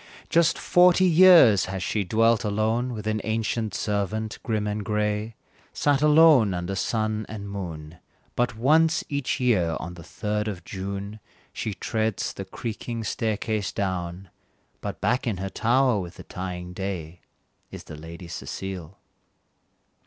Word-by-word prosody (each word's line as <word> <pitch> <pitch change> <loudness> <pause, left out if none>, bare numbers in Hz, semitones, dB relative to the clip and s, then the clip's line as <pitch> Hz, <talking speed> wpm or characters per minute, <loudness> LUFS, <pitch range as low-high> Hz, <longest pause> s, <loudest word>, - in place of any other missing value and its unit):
Just 170 0 +3
forty 180 +1 +5
years 170 - +7
has 95 0 -4
she 105 +2 -1
dwelt 115 +4 +2
alone 110 +4 0
With 105 -1 -7
an 110 0 -1
ancient 110 -1 -1
servant, 105 +1 -2
grim 110 -2 -1
and 105 0 -2
gray, 105 +1 -1 0.4
Sat 145 -1 +1
alone 150 - +6
under 90 +2 -3
sun 110 +2 -1
and 105 -2 -6
moon; 85 -5 -7 0.4
But 120 -3 0
once 160 +6 +3
each 140 -3 -1
year, 95 -10 +2
on 85 - -6
the 85 - -11
third 105 +5 -3
of 95 -5 -5
June, 100 +3 -5 0.3
She 105 -3 -4
treads 110 -2 -2
the 95 - -6
creaking 115 +3 -5
staircase 110 -1 -2
down, 90 -1 -4 0.5
But - - -5
back 125 +6 +1
in 105 -5 -1
her 95 +1 -4
tower 125 0 +2
with 90 -2 -7
the - - -10
dying 90 -1 -6
day, 90 -3 -5 0.5
Is - - -9
the 75 - -10
Lady 85 +3 -10
Cecile. 90 +2 -6
105 Hz, 145 wpm, -25 LUFS, 95-115 Hz, 0.5 s, years